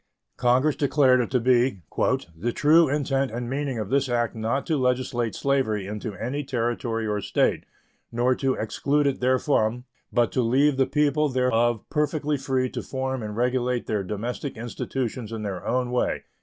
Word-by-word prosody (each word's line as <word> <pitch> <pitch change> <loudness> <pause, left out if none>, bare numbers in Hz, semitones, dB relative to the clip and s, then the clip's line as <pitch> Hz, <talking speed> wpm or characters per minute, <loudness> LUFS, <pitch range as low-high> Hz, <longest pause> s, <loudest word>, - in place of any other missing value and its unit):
Congress 130 +4 +3
declared 135 -2 +3
it 120 - -3
to 130 - +2
be 120 -5 +2 0.5
"the 110 +9 -2
true 155 +4 +4
intent 135 -2 0
and 120 +2 -4
meaning 135 0 -2
of 105 -2 -4
this 140 -1 +2
act 120 -1 0
not 115 +5 -1
to 160 - 0
legislate 125 -3 0
slavery 130 -8 0
into 105 +1 -5
any 130 +9 -3
Territory 120 -3 -2
or 105 -1 -1
State, - - +1 0.5
nor 120 +2 +2
to 135 0 0
exclude 140 +6 0
it 140 -2 0
therefrom, 125 -2 +1 0.3
but 120 -1 +2
to 130 - +1
leave 135 +4 +3
the 135 - +3
people 150 0 +2
thereof 120 -3 +1
perfectly 150 -1 0
free 130 -2 0
to - - -5
form 130 -1 -3
and 105 -1 -5
regulate 125 0 0
their 105 -2 -1
domestic 115 +8 -4
institutions 120 0 -4
in 110 -1 -5
their 95 -3 -4
own 125 -1 0
way." 125 - 0
125 Hz, 170 wpm, -25 LUFS, 115-135 Hz, 0.5 s, true